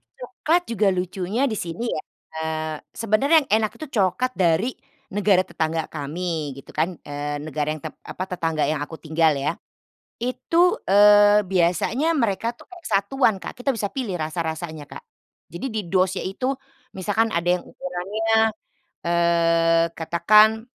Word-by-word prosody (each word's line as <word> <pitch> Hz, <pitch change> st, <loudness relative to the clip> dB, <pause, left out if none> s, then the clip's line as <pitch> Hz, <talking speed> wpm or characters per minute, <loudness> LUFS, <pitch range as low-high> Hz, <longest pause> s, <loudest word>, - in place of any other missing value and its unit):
coklat 300 Hz, +7 st, 0 dB
juga 215 Hz, -2 st, +2 dB
lucunya 185 Hz, +6 st, -2 dB
di -, -, -1 dB
sini 175 Hz, +8 st, -3 dB
ya, 155 Hz, -, -2 dB, 0.4 s
eee, 155 Hz, 0 st, -3 dB, 0.2 s
sebenarnya 275 Hz, +9 st, +3 dB
yang -, -, -21 dB
enak 215 Hz, -1 st, -1 dB
itu 310 Hz, -, -8 dB
coklat 225 Hz, +4 st, +1 dB
dari 185 Hz, +4 st, +2 dB, 0.4 s
negara 200 Hz, -2 st, +3 dB
tetangga 160 Hz, -2 st, -2 dB
kami 155 Hz, -1 st, -4 dB
gitu 135 Hz, -, -12 dB
kan, 175 Hz, +1 st, -1 dB
eee, 145 Hz, 0 st, -4 dB
negara 150 Hz, -1 st, -3 dB
yang 155 Hz, -, -11 dB
tep -, -, -7 dB
apa, 185 Hz, -, -5 dB
tetangga 165 Hz, -3 st, -1 dB
yang 150 Hz, +1 st, 0 dB
aku 150 Hz, +2 st, -5 dB
tinggal 160 Hz, -1 st, +1 dB
ya. 145 Hz, +8 st, -2 dB, 0.6 s
Itu, 335 Hz, +9 st, +1 dB
eee, 205 Hz, +1 st, +6 dB
biasanya 190 Hz, -, +1 dB
mereka 230 Hz, -1 st, 0 dB
tuh -, -, -16 dB
kayak 350 Hz, -2 st, -12 dB
satuan 210 Hz, +3 st, +2 dB
Kak, 190 Hz, -, -7 dB
kita 275 Hz, +2 st, +1 dB
bisa 205 Hz, -1 st, -1 dB
pilih 235 Hz, -9 st, -3 dB
rasa 160 Hz, +1 st, -3 dB
rasanya 160 Hz, -2 st, -5 dB
Kak. -, -, -10 dB, 0.5 s
jadi 265 Hz, +10 st, -4 dB
di 215 Hz, -4 st, -4 dB
dosnya 185 Hz, 0 st, +1 dB
itu 255 Hz, +8 st, -2 dB, 0.4 s
misalkan 205 Hz, +4 st, +1 dB
ada 170 Hz, -6 st, -1 dB, 0.2 s
yang -, -, -15 dB
ukurannya, 215 Hz, +5 st, 0 dB, 0.6 s
eee, 170 Hz, -1 st, +3 dB
katakan 215 Hz, +7 st, +4 dB
185 Hz, 150 wpm, -23 LUFS, 165-220 Hz, 0.6 s, eee